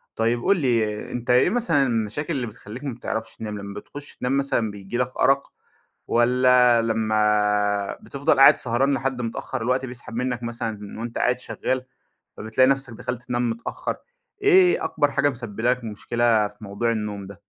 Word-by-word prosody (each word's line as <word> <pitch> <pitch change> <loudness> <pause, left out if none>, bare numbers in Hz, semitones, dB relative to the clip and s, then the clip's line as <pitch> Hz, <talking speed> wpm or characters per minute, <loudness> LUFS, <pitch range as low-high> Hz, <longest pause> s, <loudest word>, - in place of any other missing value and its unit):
طيب 115 +1 0
قُل 200 - +3
لي 115 -6 0
أنت 120 0 -5
إيه 125 +7 +5
مثلًا 180 - +2
المشاكل 115 +8 -2
اللي 125 -3 -2
بتخليك 110 +4 -10
ما 135 -4 -3
بتعرفش 110 -1 -5
تنام؟ 105 -2 -5
لما 100 0 -7
بتخش 145 +5 -11
تنام 130 +2 0
مثلًا 120 -6 0
بييجي 100 +3 -6
لك 125 0 -2
أرق، 135 +1 +2 0.5
والّا 125 0 +4
لما 105 -2 +1
بتفضل 140 0 0
قاعد 140 +2 +9
سهران 130 +4 +1
لحد 135 -1 -2
متأخر 115 +2 -4
الوقت 130 +3 0
بيسحب 120 -2 -9
منك 125 -1 -2
مثلًا 110 -3 -5
وأنت 120 0 -5
قاعد 125 0 +1
شغّال، 130 0 -3 0.5
فَبتلاقي 110 +5 +2
نفسك 135 -3 0
دخلت 120 +2 -5
تنام 120 -1 -1
متأخر، 115 +1 -4 0.5
إيه 375 -3 +5
أكبر 145 -1 +1
حاجة 145 - +2
مُسبّبة 115 -4 -7
لك 125 -1 -1
مشكلة 110 0 +1
في 105 +1 -15
موضوع 100 +4 -1
النوم 105 -3 -4
ده؟ 100 0 -12
120 Hz, 165 wpm, -23 LUFS, 110-130 Hz, 0.5 s, قاعد